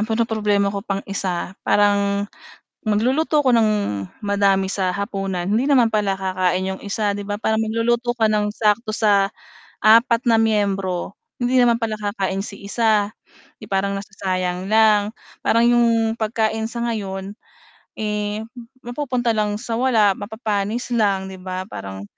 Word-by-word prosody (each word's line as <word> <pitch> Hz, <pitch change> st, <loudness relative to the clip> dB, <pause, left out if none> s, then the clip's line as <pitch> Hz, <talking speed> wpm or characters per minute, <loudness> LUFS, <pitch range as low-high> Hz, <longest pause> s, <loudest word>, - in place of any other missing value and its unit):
ang 215 Hz, -, -1 dB
pinoproblema 210 Hz, -3 st, +1 dB
ko 200 Hz, -, -3 dB
pang 195 Hz, -1 st, -4 dB
isa 185 Hz, -2 st, -3 dB
parang 200 Hz, -1 st, +2 dB, 0.6 s
mag-luluto 265 Hz, +8 st, +2 dB
ako 255 Hz, -2 st, +3 dB
ng 225 Hz, -2 st, +4 dB, 0.6 s
madami 200 Hz, -1 st, +2 dB
sa 190 Hz, -2 st, 0 dB
hapunan, 195 Hz, -3 st, -3 dB
hindi 220 Hz, +8 st, +1 dB
naman 245 Hz, -5 st, +4 dB
pala 205 Hz, -2 st, +1 dB
kakain 185 Hz, -1 st, 0 dB
yung 190 Hz, -, -10 dB
isa 205 Hz, +1 st, -1 dB
di 205 Hz, -, -5 dB
ba 205 Hz, -, -2 dB
parang 220 Hz, 0 st, 0 dB
magluluto 235 Hz, +2 st, 0 dB
ka 225 Hz, -, +3 dB
ng 210 Hz, -1 st, +1 dB
sakto 215 Hz, +1 st, +1 dB
sa 205 Hz, -3 st, +3 dB, 0.5 s
4 230 Hz, +2 st, +5 dB
na 230 Hz, -, +5 dB
miyembro, 200 Hz, -4 st, 0 dB, 0.3 s
hindi 245 Hz, +1 st, +1 dB
naman 240 Hz, -2 st, +4 dB
pala 220 Hz, -1 st, -1 dB
kakain 195 Hz, -2 st, -2 dB
si 200 Hz, -, -9 dB
isa, 215 Hz, -2 st, +2 dB, 0.5 s
'di -, -, -11 dB
parang 200 Hz, +1 st, 0 dB
nasasayang 185 Hz, -2 st, -3 dB
lang, 215 Hz, -2 st, +4 dB, 0.3 s
parang 230 Hz, +1 st, +3 dB
yung 240 Hz, -1 st, +4 dB, 0.3 s
pagkain 220 Hz, 0 st, 0 dB
sa 235 Hz, 0 st, -3 dB
ngayon, 195 Hz, -4 st, -4 dB, 0.6 s
eh, 210 Hz, 0 st, -2 dB, 0.4 s
mapupunta 245 Hz, -1 st, -1 dB
lang 210 Hz, -2 st, 0 dB
sa 230 Hz, +1 st, -4 dB
wala, 225 Hz, -6 st, +4 dB
mapapanis 220 Hz, +2 st, -3 dB
lang 200 Hz, -5 st, +1 dB
di 190 Hz, -, -9 dB
ba 185 Hz, 0 st, -5 dB
parang, 95 Hz, 0 st, -7 dB
210 Hz, 145 wpm, -21 LUFS, 195-230 Hz, 0.6 s, 4